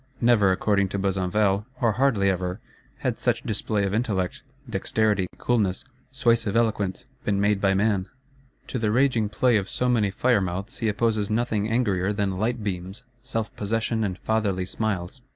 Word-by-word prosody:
Never, 115 -5 +4
according 100 +1 +1
to 100 - -3
Besenval, 95 +2 +1
or 115 -3 +3
hardly 110 -3 +2
ever, 90 +1 -1 0.4
had - - -1
such - - 0
display 105 -1 -1
of 100 0 -1
intellect, 105 -5 -1 0.3
dexterity, 105 -2 +1
coolness, 110 -2 0 0.3
suasive 115 -5 +1
eloquence, 110 -1 0 0.2
been 100 -1 0
made 100 0 +2
by 95 -1 +3
man. 100 -1 +1 0.6
To 125 - -2
the 110 -2 +1
raging 120 -3 +2
play 120 +2 +3
of 100 -1 -3
so 125 - -1
many 115 -5 +2
fire 120 +3 +2
mouths 95 +4 -4
he 115 - 0
opposes 110 -1 +1
nothing 110 -2 0
angrier 100 -5 +1
than 100 -2 -1
light 115 +1 -1
beams, 95 +3 -4 0.2
self 115 -1 -4
possession 110 +2 -1
and 95 -3 -2
fatherly 100 -4 0
smiles. 105 +3 -3
105 Hz, 160 wpm, -25 LUFS, 95-115 Hz, 0.6 s, Never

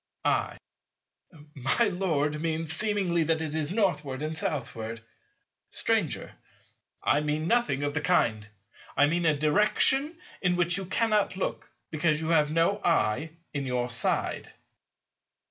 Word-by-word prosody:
I. - - 0 1.0
My 140 - +2
Lord 155 -5 -1
means 160 -1 -2
seemingly 195 -3 0
that 160 0 +1
it 155 -2 -4
is 155 0 -1
Northward 155 -10 -1
and 155 +1 -3
Southward. 115 -7 -3 0.7
Stranger. - - -1 0.7
I 145 - +3
mean 150 +1 -1
nothing 230 - +1
of 145 0 -1
the 150 - -1
kind. 110 -11 +1 0.5
I 145 - +6
mean 170 +3 +1
a 155 -2 +3
direction 210 - +2 0.2
in 180 -1 +2
which 175 -1 +2
you 195 - -4
cannot 210 -2 +1
look, - - -3 0.2
because 155 -1 +1
you 160 0 -3
have 155 -3 +4
no 165 +6 +1
eye 150 -2 +1 0.2
in 140 -2 -3
your 125 -1 -1
side. 115 - -1
160 Hz, 135 wpm, -28 LUFS, 145-180 Hz, 1.0 s, I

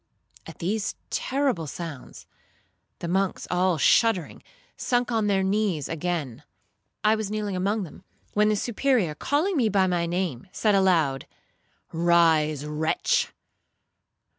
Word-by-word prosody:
At - - -10
these 205 +4 -2 0.2
terrible 260 - -1
sounds 160 -3 -8 0.7
the 170 - -5
monks, 190 +2 0
all 180 -1 +2
shuddering, 195 +1 +2 0.3
sunk 245 0 0
on 220 -2 +1
their 195 -2 +2
knees 190 -6 0
again. 160 -6 -3 0.6
I 215 +1 +5
was 215 -2 -2
kneeling 210 -2 -3
among 200 +3 0
them, 170 - -11 0.3
when 210 0 +3
the 215 - +2
Superior, 235 - +1
calling 305 - 0
me 240 -7 +2
by 195 -2 +3
my 175 -2 0
name, 175 -6 -3
said 215 -2 +1
aloud, 170 -9 +2 0.7
'Rise, 160 -3 +3
wretch! 150 +1 0
185 Hz, 125 wpm, -25 LUFS, 165-215 Hz, 0.7 s, I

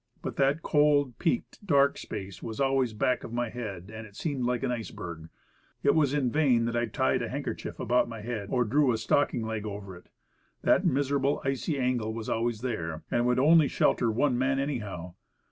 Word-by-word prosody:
But - - -4
that 140 +4 +2
cold, 145 -4 +3
peaked, 235 -2 -1
dark 140 -7 +4
space 95 -2 -7
was 110 +1 -6
always 135 -3 +2
back 125 +4 0
of - - -7
my 120 0 -1
head, 105 -5 -6
and 110 0 -7
it 100 - -19
seemed 140 -3 -2
like 125 +1 -1
an 130 - 0
ice 115 -3 -3
berg. 80 -2 -8 0.5
It 140 - +5
was 150 -4 +3
in 140 -4 +1
vain 130 -6 +3
that 115 0 -2
I 120 0 +1
tied - - +1
a - - -3
handkerchief - - -5
about 125 0 +2
my 115 -2 -7
head, 110 -3 -4
or 125 - +3
drew 135 +4 +3
a - - 0
stocking 115 +1 +1
leg 110 -1 -3
over 100 -3 -6
it. 90 - -16 0.5
That - - +4
miser 140 +1 +1
able, 140 +2 +1
icy 135 +3 -1
angle 125 -4 0
was 115 -1 -5
always 115 -1 -1
there. 85 -11 -3
And - - +2
it - - +2
would 125 0 +2
only 155 +3 +6
shelter 120 - +2
one 125 +2 +1
man 135 +1 +1
anyhow. 105 - -3
120 Hz, 210 wpm, -28 LUFS, 110-140 Hz, 0.5 s, only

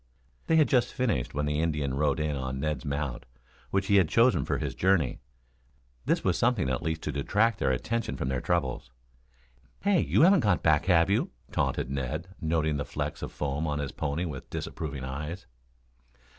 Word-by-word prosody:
They 160 - +3
had 155 -2 +5
just 125 -2 +2
finished 115 - -1
when 75 0 0
the 75 0 0
Indian 75 -4 0
rode 75 +2 +1
in 75 -1 -1
on 65 0 -3
Ned's 75 +2 -2
mount, 70 -4 -3 0.5
which 95 - 0
he 100 -1 +4
had 90 -5 +4
chosen 120 +2 +4
for - - 0
his - - -3
journey. 90 -8 +1 0.9
This - - +2
was 90 -3 +1
something 115 - +2
at 65 - -1
least 80 0 -3
to - - -2
detract 105 - +1
their - - +1
attention 110 - -1
from - - -2
their 65 -1 -1
troubles. 70 -8 -1 0.9
"Hey, 200 -3 +3
you - - +3
haven't 190 +2 +6
got 100 - +1
back, 80 -1 +3
have 90 0 +4
you?" 100 - +1 0.2
taunted 65 - -1
Ned, 70 +6 -3
noting 80 -2 +1
the 70 - -2
flecks - - -4
of - - -5
foam 75 +2 -2
on 75 -1 -1
his 70 -2 -3
pony 75 +6 -2
with 70 -6 -7
disapproving 70 -4 -5
eyes. 75 +7 -5
80 Hz, 185 wpm, -28 LUFS, 70-95 Hz, 0.9 s, haven't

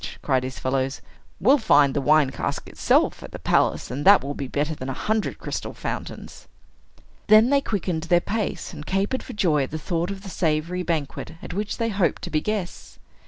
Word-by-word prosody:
cried 130 -3 +1
his 130 0 -5
fellows: 130 +1 -1 0.4
"we'll 270 +8 +5
find 145 - +4
the 145 - 0
wine 150 -1 +4
cask - - -4
itself - - +1
at - - -9
the - - -7
palace, - - +1
and 140 +3 -3
that 200 +4 +7
will 140 +1 -3
be 140 - -5
better 150 +4 -1
than 135 -3 -6
a - - -2
hundred 215 +9 -1
crystal - - -5
fountains." - - -6 0.8
Then 215 +4 +6
they 280 -1 +4
quickened 180 -9 -2
their 175 0 +4
pace, 210 +1 -3
and 150 -2 -8
capered 195 +10 -1
for - - -9
joy 165 -8 +2
at 135 - -2
the 155 - -4
thought 170 +3 -2
of 195 -1 -6
the 195 - -7
savory 165 +2 0
banquet 160 -4 -3
at - - -6
which 205 +2 -3
they 230 0 0
hoped 195 -4 0
to - - -5
be 155 - +1
guests. 210 -3 -4
170 Hz, 205 wpm, -24 LUFS, 145-200 Hz, 0.8 s, that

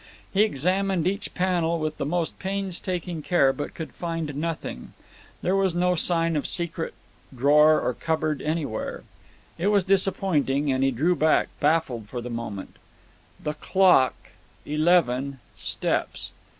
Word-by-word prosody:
He 200 - +4
examined 190 -1 +1
each 200 +3 -1
panel 175 -3 +1
with 155 0 -3
the 140 - -2
most 170 +1 -1
painstaking 185 -3 -3
care, 140 -5 +3
but 145 +1 -6
could 160 - -6
find 165 -3 -3
nothing. 155 - -4 0.5
There 185 - +2
was 190 -3 +1
no 180 +1 +2
sign 165 -1 +1
of 145 - -1
secret 170 -1 -2 0.4
drawer 150 +4 +5
or 125 - -1
cupboard 155 0 -1
anywhere. 150 -7 -3 0.6
It 180 - +1
was 205 -2 +3
disappointing, 175 -7 +2
and 130 0 +1
he 135 - +4
drew 155 +8 +1
back, 155 -1 +3
baffled 145 -8 +1
for 125 - -4
the 120 0 -6
moment 115 -4 -6 0.6
"The 150 - -3
clock 180 -4 +4 0.5
eleven 145 -4 +2 0.2
steps." - - -2
160 Hz, 135 wpm, -25 LUFS, 140-180 Hz, 0.6 s, drawer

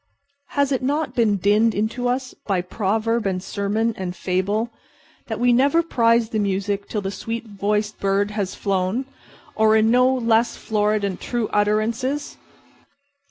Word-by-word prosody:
Has 280 -1 +2
it 265 - 0
not 290 +4 -1
been 220 -4 +2
dinned 210 +4 +3
into 225 +4 -1
us 255 +1 -2
by 195 -3 +1
proverb 215 +4 -1
and 190 -1 0
sermon 215 +4 -1
and 185 -1 -5
fable 200 +6 -1 0.6
that - - -4
we 245 0 +4
never 280 +7 +3
prize 230 -6 +2
the 220 - -1
music 200 0 -1
till 210 - -2
the 195 0 -3
sweet 230 +3 -5
voiced 210 +1 -2
bird 200 +1 +1
has 205 -3 -3
flown—or 215 +2 -1
in 220 0 +4
other - - +3
no 250 +1 +5
less 235 -2 +2
florid 210 -1 0
and 195 -3 -3
true 240 -3 -2
utterances? 225 +7 0
220 Hz, 155 wpm, -22 LUFS, 200-240 Hz, 0.6 s, no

